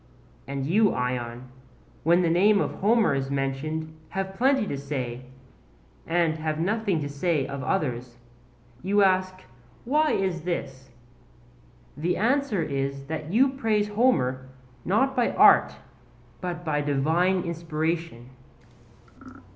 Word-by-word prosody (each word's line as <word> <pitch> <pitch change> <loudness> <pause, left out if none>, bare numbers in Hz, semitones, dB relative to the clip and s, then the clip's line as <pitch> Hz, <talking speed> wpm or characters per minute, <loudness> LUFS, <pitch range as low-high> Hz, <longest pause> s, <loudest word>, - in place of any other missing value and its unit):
And 135 -1 -3
you, 205 +7 +3
Ion, 125 0 -3 0.5
when 170 +3 +3
the 170 - +2
name 200 +4 +4
of - - -1
Homer 220 +3 +2
is 135 -1 -2
mentioned 145 +4 -3
have 190 0 -4
plenty 265 +2 +2
to 140 - -3
say, 130 -3 -5 0.8
and 165 -1 +1
have 155 -1 -2
nothing 200 0 0
to 145 - -3
say 145 0 -1
of 140 -1 -6
others. 125 -7 -2 0.6
You 200 +2 +2
ask, 185 -1 +1 0.4
'Why 300 +5 +2
is 185 -3 -1
this?' 135 -6 -5 1.1
The 170 +4 -1
answer 245 - +1
is 140 -1 -3
that 155 +1 -5
you 260 +7 +4
praise 220 -6 0
Homer 130 - +1 0.4
not 265 +8 +1
by 245 - +1
art - - +6 0.7
but 175 -1 -5
by 150 -2 0
divine 160 +6 +1
inspiration. 165 -6 -3
165 Hz, 125 wpm, -26 LUFS, 140-195 Hz, 1.1 s, art